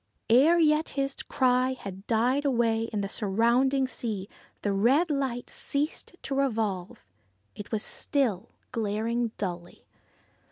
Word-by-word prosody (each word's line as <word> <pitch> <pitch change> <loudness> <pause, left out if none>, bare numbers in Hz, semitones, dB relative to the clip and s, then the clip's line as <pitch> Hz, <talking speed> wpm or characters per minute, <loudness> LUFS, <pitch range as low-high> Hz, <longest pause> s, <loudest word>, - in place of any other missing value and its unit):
Ere 290 +9 +6
yet 310 -1 +3
his 275 0 0
cry 255 0 +2
had 195 -5 -9
died 245 +5 +2
away 230 -4 +1
on 210 -2 -1
the 200 - -2
surrounding 235 +7 +2
sea 215 -6 -4 0.4
the 205 - +1
red 265 - +3
light 265 -4 -2
ceased 290 +5 -1
to 275 - -3
revolve. 220 -6 -1 0.5
It 205 - -9
was 220 -2 -1
still, 245 -11 -1 0.2
glaring 230 +1 -1
dully. 175 -3 -6
235 Hz, 125 wpm, -28 LUFS, 210-270 Hz, 0.5 s, Ere